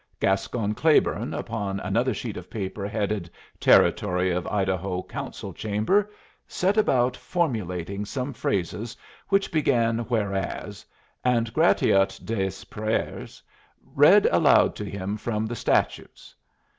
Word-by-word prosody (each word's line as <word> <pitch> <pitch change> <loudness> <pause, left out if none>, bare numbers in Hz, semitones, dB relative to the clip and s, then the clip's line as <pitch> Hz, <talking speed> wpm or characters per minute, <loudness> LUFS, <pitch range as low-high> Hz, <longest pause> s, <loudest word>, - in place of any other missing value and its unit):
Gascon 100 +3 0
Claiborne, 155 +7 +2
upon 100 -4 -3
another - - 0
sheet - - -5
of - - -9
paper 100 -1 -4
headed 105 -4 -2 0.3
"Territory 90 0 +3
of 90 0 -2
Idaho, 95 -2 -1
Council - - -7
Chamber," 110 - 0 0.4
set 190 +3 0
about 130 - +2
formulating 100 - -2
some 130 +6 -4
phrases 105 +4 -3 0.3
which 195 0 +2
began 115 -7 +2
"Whereas," 100 -6 -3 0.4
and 115 -2 +1
Gratiot 95 - +3
des 95 -4 -3
Pères 110 +1 -3 0.5
read - - +6
aloud - - +4
to - - -5
him 100 +1 -4
from 110 0 -2
the 120 +2 -4
statutes. - - -1
105 Hz, 115 wpm, -25 LUFS, 95-120 Hz, 0.5 s, read